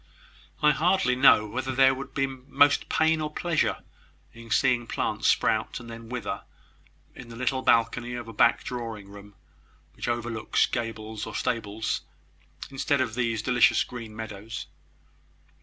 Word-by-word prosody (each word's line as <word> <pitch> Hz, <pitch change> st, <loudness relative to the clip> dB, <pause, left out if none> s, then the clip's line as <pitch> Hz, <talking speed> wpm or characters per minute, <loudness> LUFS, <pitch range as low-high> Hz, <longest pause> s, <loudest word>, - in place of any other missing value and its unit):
"I 150 Hz, -, +7 dB
hardly 170 Hz, -3 st, +2 dB
know 125 Hz, -4 st, +6 dB
whether 130 Hz, +5 st, -3 dB
there 135 Hz, 0 st, +6 dB
would 135 Hz, 0 st, -8 dB
be 135 Hz, -, +2 dB
most 135 Hz, +2 st, +2 dB
pain 160 Hz, 0 st, +2 dB
or 150 Hz, 0 st, -3 dB
pleasure 170 Hz, 0 st, 0 dB, 0.5 s
in 115 Hz, 0 st, -12 dB
seeing 120 Hz, 0 st, +2 dB
plants -, -, -1 dB
sprout, -, -, +1 dB
and 115 Hz, 0 st, -10 dB
then 115 Hz, 0 st, -10 dB
wither, 125 Hz, -1 st, -4 dB, 0.7 s
in 125 Hz, -2 st, -11 dB
the 115 Hz, -, -9 dB
little 130 Hz, +2 st, -1 dB
balcony 120 Hz, +1 st, +2 dB
of 120 Hz, -2 st, -6 dB
a 115 Hz, -, -8 dB
back 115 Hz, +2 st, +3 dB
drawing 115 Hz, -5 st, -6 dB
room, 100 Hz, 0 st, -13 dB, 0.6 s
which -, -, -6 dB
overlooks 120 Hz, -2 st, 0 dB
gables 110 Hz, -2 st, -4 dB
or 110 Hz, -, -7 dB
stables, 110 Hz, -4 st, -2 dB, 0.7 s
instead 140 Hz, +1 st, 0 dB
of 125 Hz, -4 st, 0 dB
these 115 Hz, -2 st, -1 dB
delicious 125 Hz, -1 st, +4 dB
green 115 Hz, -3 st, -9 dB
meadows." 110 Hz, 0 st, -7 dB
120 Hz, 145 wpm, -27 LUFS, 115-130 Hz, 0.7 s, I